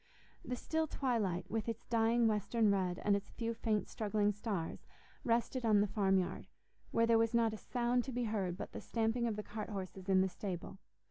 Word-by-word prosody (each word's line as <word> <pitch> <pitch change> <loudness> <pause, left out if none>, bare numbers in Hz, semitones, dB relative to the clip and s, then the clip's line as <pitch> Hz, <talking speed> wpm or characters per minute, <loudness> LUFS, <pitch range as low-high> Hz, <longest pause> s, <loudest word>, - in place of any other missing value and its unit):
The 250 - -3
still 320 +5 -1
twilight, 210 - 0
with 220 +2 -2
its 230 0 -5
dying 230 0 +3
western 215 +1 +2
red 185 -3 +1
and 205 - +5
its 200 - -4
few 230 -1 -3
faint 215 -2 0
struggling 210 -1 +1
stars, 200 -5 -4 0.4
rested 240 +2 +1
on 215 -3 +5
the 205 - +4
farm 195 -2 +2
yard, 185 - -2 0.4
where 230 - +3
there 230 0 +5
was 230 +1 +2
not 230 -2 +3
a - - -5
sound 245 +2 0
to 270 - -4
be 245 0 -1
heard 195 -5 -1
but - - -6
the - - -6
stamping 230 +1 0
of 220 - -1
the 210 - -4
cart 210 +1 -6
horses 190 -1 -6
in 190 -1 +5
the 190 - +3
stable. 190 0 -5
220 Hz, 205 wpm, -35 LUFS, 200-230 Hz, 0.4 s, and